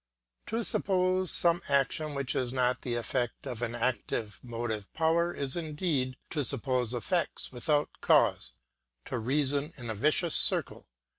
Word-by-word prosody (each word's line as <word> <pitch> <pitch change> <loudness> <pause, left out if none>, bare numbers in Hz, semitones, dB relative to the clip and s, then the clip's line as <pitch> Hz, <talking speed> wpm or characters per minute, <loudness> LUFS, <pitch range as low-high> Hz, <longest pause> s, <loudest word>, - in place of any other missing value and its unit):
To 230 +2 -1
suppose 185 -3 +1
some 170 0 +2
action 140 +2 +1
which 140 -2 -2
is 125 -2 0
not 125 -1 +1
the 120 -2 -2
effect 120 +2 -2
of 125 -4 -5
an 120 0 -2
active 120 -3 -2
motive 115 -4 -4
power 165 +2 +2
is 140 -5 -2
indeed 150 -5 -1
to 150 -3 0
suppose 125 -2 -1
effects 175 +8 -1
without 145 +4 0
cause, - - +4 0.5
to 125 - -3
reason 140 +5 0
in 120 -3 -5
a - - -1
vicious 155 - +2
circle. - - +3
135 Hz, 145 wpm, -30 LUFS, 120-160 Hz, 0.5 s, cause